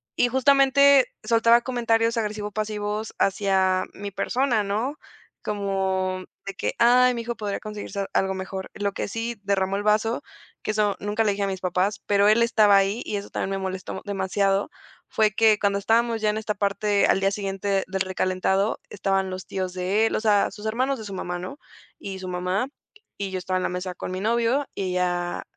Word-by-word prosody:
y, -, -, +3 dB
justamente, 275 Hz, +1 st, +5 dB, 0.2 s
soltaba 230 Hz, +1 st, +4 dB
comentarios 230 Hz, -2 st, +1 dB
agresivo-pasivos 210 Hz, 0 st, -3 dB
hacia 190 Hz, -1 st, +2 dB
mi 200 Hz, 0 st, -7 dB
persona, 240 Hz, +2 st, 0 dB
¿no?, 220 Hz, +9 st, -2 dB, 0.5 s
como 190 Hz, -2 st, -1 dB, 0.2 s
de 195 Hz, -, -5 dB
que: -, -, -3 dB
"Ay, 250 Hz, +1 st, +5 dB
mi 235 Hz, -, -3 dB
hijo 235 Hz, +1 st, -4 dB
podría 205 Hz, -2 st, -3 dB
conseguirse 205 Hz, -2 st, -5 dB
algo 190 Hz, 0 st, +1 dB
mejor". 190 Hz, 0 st, -6 dB
Lo 200 Hz, 0 st, -1 dB
que -, -, -4 dB
sí 230 Hz, +2 st, -4 dB
derramó 195 Hz, -1 st, 0 dB
el 200 Hz, -, -1 dB
vaso, 215 Hz, +2 st, +1 dB, 0.4 s
que -, -, -6 dB
eso 210 Hz, -1 st, +1 dB
nunca 210 Hz, +2 st, 0 dB
le 210 Hz, -, +2 dB
dije 200 Hz, -, -3 dB
a -, -, 0 dB
mis 190 Hz, -1 st, -4 dB
papás, 185 Hz, +3 st, 0 dB
pero 200 Hz, 0 st, +3 dB
él 220 Hz, +2 st, +5 dB
estaba 215 Hz, -3 st, +5 dB
ahí 195 Hz, +4 st, +1 dB
y -, -, -3 dB
eso 200 Hz, 0 st, -5 dB
también -, -, -2 dB
me 195 Hz, -, -2 dB
molestó 190 Hz, 0 st, -5 dB
demasiado, 195 Hz, 0 st, 0 dB, 0.4 s
fue 215 Hz, -1 st, +2 dB
que, 215 Hz, 0 st, +4 dB
cuando 200 Hz, -1 st, +1 dB
estábamos 230 Hz, +2 st, +1 dB
ya 215 Hz, -, +2 dB
en 210 Hz, -, -1 dB
esta 220 Hz, -1 st, -2 dB
parte, 200 Hz, 0 st, +1 dB
al -, -, +3 dB
día 195 Hz, 0 st, +2 dB
siguiente 195 Hz, -1 st, -1 dB
del 190 Hz, 0 st, -3 dB
recalentado, 190 Hz, +2 st, 0 dB
estaban 195 Hz, -1 st, 0 dB
los 185 Hz, 0 st, -7 dB
tíos 185 Hz, -1 st, -3 dB
de 185 Hz, +4 st, +1 dB
él, -, -, 0 dB
o -, -, -1 dB
sea, 210 Hz, -2 st, +3 dB
sus 210 Hz, +1 st, -7 dB
hermanos 255 Hz, +4 st, 0 dB
de 220 Hz, -, -7 dB
su 200 Hz, -, -7 dB
mamá, 180 Hz, -1 st, -4 dB
¿no?, 185 Hz, +10 st, -7 dB, 0.4 s
y 195 Hz, -1 st, -7 dB
su 185 Hz, -, -7 dB
mamá, 180 Hz, +6 st, -1 dB, 0.5 s
y 195 Hz, -1 st, -4 dB
yo 185 Hz, -, -2 dB
estaba 185 Hz, +1 st, -2 dB
en 185 Hz, -, -2 dB
la -, -, 0 dB
mesa 180 Hz, 0 st, -4 dB
con -, -, -6 dB
mi 185 Hz, -, -3 dB
novio, 235 Hz, +6 st, +1 dB
y 195 Hz, -, -3 dB
ella 175 Hz, -1 st, -1 dB
205 Hz, 195 wpm, -24 LUFS, 190-225 Hz, 0.5 s, justamente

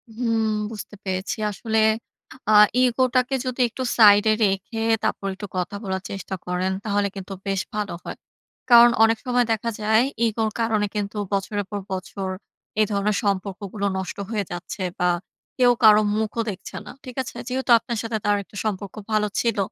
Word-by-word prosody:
হুম, 230 Hz, -2 st, 0 dB, 0.3 s
বুঝতে 210 Hz, -1 st, -8 dB
পেরেছি। 190 Hz, +1 st, -3 dB
আসলে 220 Hz, +2 st, -1 dB, 0.7 s
আ -, -, +5 dB, 0.3 s
ইগোটাকে 255 Hz, +1 st, +2 dB
যদি 255 Hz, 0 st, -2 dB
একটু 260 Hz, -, -5 dB
সাইডে 210 Hz, -1 st, +7 dB
রেখে 195 Hz, +3 st, -1 dB, 0.2 s
তারপর 195 Hz, -, -1 dB
একটু 205 Hz, +1 st, -7 dB
কথা 180 Hz, +3 st, -2 dB
বলার 190 Hz, -2 st, -2 dB
চেষ্টা 195 Hz, 0 st, -5 dB
করেন, 180 Hz, +1 st, -1 dB
তাহলে 205 Hz, -1 st, +1 dB
কিন্তু 195 Hz, 0 st, -7 dB
বেশ 195 Hz, -1 st, 0 dB
ভালো 210 Hz, -3 st, -2 dB
হয়। -, -, -7 dB, 0.5 s
কারণ 240 Hz, 0 st, +9 dB
অনেক 225 Hz, 0 st, +4 dB
সময় 245 Hz, -1 st, +2 dB
দেখা 225 Hz, +1 st, 0 dB
যায় 220 Hz, +2 st, +4 dB, 0.2 s
ইগোর 220 Hz, 0 st, 0 dB
কারণে 220 Hz, -2 st, +1 dB
কিন্তু 205 Hz, 0 st, -3 dB, 0.2 s
বছরের 200 Hz, +1 st, -1 dB
পর 205 Hz, -, -2 dB
বছর 190 Hz, +1 st, -4 dB, 0.5 s
এ -, -, +6 dB
ধরনের 200 Hz, 0 st, +1 dB
সম্পর্কগুলো 200 Hz, 0 st, -2 dB
নষ্ট 190 Hz, -2 st, -5 dB
হয়ে 215 Hz, -3 st, -1 dB
যাচ্ছে 175 Hz, +2 st, -6 dB, 0.2 s
বা 180 Hz, -, +3 dB, 0.5 s
কেউ 250 Hz, -2 st, +5 dB
কারো 215 Hz, -1 st, +8 dB, 0.2 s
মুখও 220 Hz, +1 st, -1 dB
দেখছে 190 Hz, 0 st, -10 dB
না। -, -, -8 dB
ঠিক 250 Hz, -2 st, -9 dB
আছে? 260 Hz, -, -8 dB
যেহেতু 260 Hz, 0 st, -1 dB
আপনার 235 Hz, 0 st, -4 dB
সাথে 225 Hz, -1 st, -2 dB
তার 205 Hz, 0 st, +3 dB
একটা 205 Hz, -, -20 dB
সম্পর্ক 200 Hz, -2 st, -3 dB, 0.2 s
ভালো 215 Hz, -1 st, +2 dB
ছিল 230 Hz, -2 st, 0 dB
210 Hz, 165 wpm, -23 LUFS, 195-230 Hz, 0.7 s, কারণ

